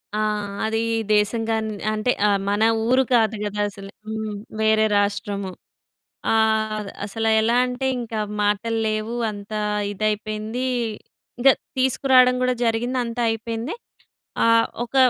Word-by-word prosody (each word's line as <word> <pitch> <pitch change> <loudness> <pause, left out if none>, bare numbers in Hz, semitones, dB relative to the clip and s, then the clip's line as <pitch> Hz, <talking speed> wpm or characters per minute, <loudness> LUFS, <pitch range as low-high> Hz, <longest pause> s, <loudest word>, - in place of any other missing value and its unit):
ఆ! - - 0 0.5
అది 225 +1 0 0.3
దేశం 210 +2 +2
గాని 220 -1 -1 0.2
అంటే 215 +3 +1 0.2
ఆహ్, 200 -1 +2
మన 205 +2 +1 0.2
ఊరు 260 +2 +4
కాదు 225 -2 +3
గదా! 205 0 -2
అసలే. 195 0 -11 0.2
హ్మ్, 220 -1 -4 0.3
వేరే 220 0 +4
రాష్ట్రము. 200 -1 -1 0.8
ఆహ్, 220 -1 +1 0.2
అసలు 225 +2 -1
ఎలా 230 +2 +2
అంటే, 250 +1 -2
ఇంక 230 -1 -7 0.3
మాటలు 210 +2 0
లేవు, 215 +2 -2 0.2
అంత 205 +1 -10 0.4
ఇదైపోయింది. 215 +4 -2 0.7
ఇంకా 270 +2 +7 0.3
తీసుకురావడం 255 -1 +4
గూడా 255 0 +2
జరిగింది, 240 +3 0
అంతా 235 +1 -4
అయిపోయింది. 225 +4 -3 0.7
ఆహ్, 230 0 +5 0.2
ఒక 245 +3 -9
220 Hz, 125 wpm, -23 LUFS, 210-235 Hz, 0.8 s, ఇంకా